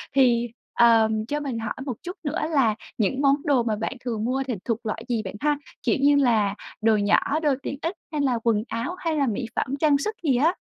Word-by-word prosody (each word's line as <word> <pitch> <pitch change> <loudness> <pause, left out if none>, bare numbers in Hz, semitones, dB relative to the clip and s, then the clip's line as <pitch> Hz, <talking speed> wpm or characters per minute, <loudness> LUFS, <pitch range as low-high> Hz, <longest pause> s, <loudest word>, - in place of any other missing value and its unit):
thì, 240 -3 +4 0.3
ờ, 225 -2 +5 0.2
cho 295 +2 -1
mình 265 -6 -3
hỏi 220 -1 -3
một 260 - -2
chút 360 +1 -6
nữa 310 +4 -2
là 240 -8 +3 0.2
những 250 +6 0
món 275 -1 +5
đồ 275 -5 +3
mà 225 -2 0
bạn 225 +4 -3
thường 225 -3 -2
mua 265 +2 0
thì 250 - -1
thuộc 230 0 -2
loại 225 +1 -3
gì 235 -4 0
bạn 190 - -6
ha? 295 0 +1 0.3
Kiểu 235 - +2
như 285 +1 +5
là 220 -7 +3 0.3
đồ 220 -1 +4
nhỏ, 210 +9 +2
đồ 295 -3 +3
tiện 275 - -4
ích 335 +4 -2 0.2
hay 300 -2 -1
là 250 -4 +1
quần 220 -3 +2
áo 230 +11 -3
hay 325 -2 -1
là 280 -3 +1
mỹ 230 +2 -2
phẩm 275 +2 -1
trang 295 -2 +4
sức 430 +10 -3
gì 275 -5 +3
á? 320 +7 +3
255 Hz, 235 wpm, -24 LUFS, 225-290 Hz, 0.3 s, ờ